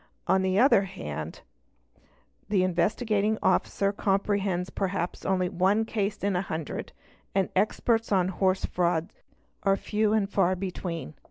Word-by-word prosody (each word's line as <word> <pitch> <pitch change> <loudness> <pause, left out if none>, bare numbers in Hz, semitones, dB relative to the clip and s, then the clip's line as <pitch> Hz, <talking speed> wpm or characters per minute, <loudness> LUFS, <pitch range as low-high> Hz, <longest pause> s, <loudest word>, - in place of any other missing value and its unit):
On 190 0 +3
the 190 0 +1
other 240 -3 +6
hand 80 - -6 1.1
the 195 -3 +3
Investigating 210 +4 +1
Officer 200 0 +2
comprehends 195 -2 0
perhaps 190 -2 -3
only 185 -1 +2
one 190 +5 +2
case 210 -2 -2
in 200 -1 +1
a 180 - +1
hundred 160 -5 -5 0.4
and 195 -2 +2
experts 225 +3 +1
on 185 -2 +3
horse 190 0 +1
frauds 175 +1 -1 0.4
are 195 -1 +2
few 215 +1 0
and 215 -2 +2
far 190 -2 +2
between. 180 - -5
195 Hz, 135 wpm, -27 LUFS, 180-205 Hz, 1.1 s, other